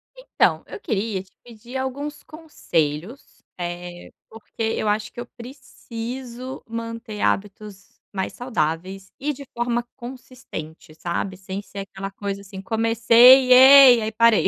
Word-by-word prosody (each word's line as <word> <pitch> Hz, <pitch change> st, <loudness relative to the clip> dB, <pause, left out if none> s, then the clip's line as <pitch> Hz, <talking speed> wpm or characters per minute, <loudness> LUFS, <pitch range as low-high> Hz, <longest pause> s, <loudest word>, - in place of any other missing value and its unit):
Então, -, -, 0 dB
eu -, -, -8 dB
queria 210 Hz, -, -2 dB
te 190 Hz, -, -28 dB
pedir 240 Hz, +2 st, -9 dB
alguns 285 Hz, +3 st, -5 dB
conselhos, 195 Hz, -, -4 dB, 0.2 s
eh, 175 Hz, 0 st, -6 dB, 0.2 s
porque 225 Hz, +1 st, -12 dB
eu 220 Hz, -1 st, -1 dB
acho 210 Hz, 0 st, -1 dB
que -, -, -11 dB
eu 240 Hz, -, -5 dB
preciso 245 Hz, 0 st, -8 dB
manter 230 Hz, -1 st, -6 dB
hábitos 200 Hz, -1 st, -3 dB, 0.2 s
mais 190 Hz, -1 st, -3 dB
saudáveis 190 Hz, -4 st, -3 dB
e 295 Hz, +2 st, -2 dB
de 280 Hz, +1 st, -11 dB
forma 240 Hz, 0 st, -1 dB
consistente, 240 Hz, -, -10 dB
sabe. 180 Hz, +3 st, -4 dB
Sem 190 Hz, +1 st, -6 dB
ser 200 Hz, -, -10 dB
aquela 195 Hz, 0 st, -6 dB
coisa 200 Hz, 0 st, -5 dB
assim, 195 Hz, -1 st, -10 dB
comecei, 230 Hz, +4 st, +5 dB
ei, 260 Hz, -1 st, +9 dB
aí 220 Hz, 0 st, -2 dB
parei. 230 Hz, 0 st, +4 dB
225 Hz, 135 wpm, -22 LUFS, 195-250 Hz, 0.2 s, ei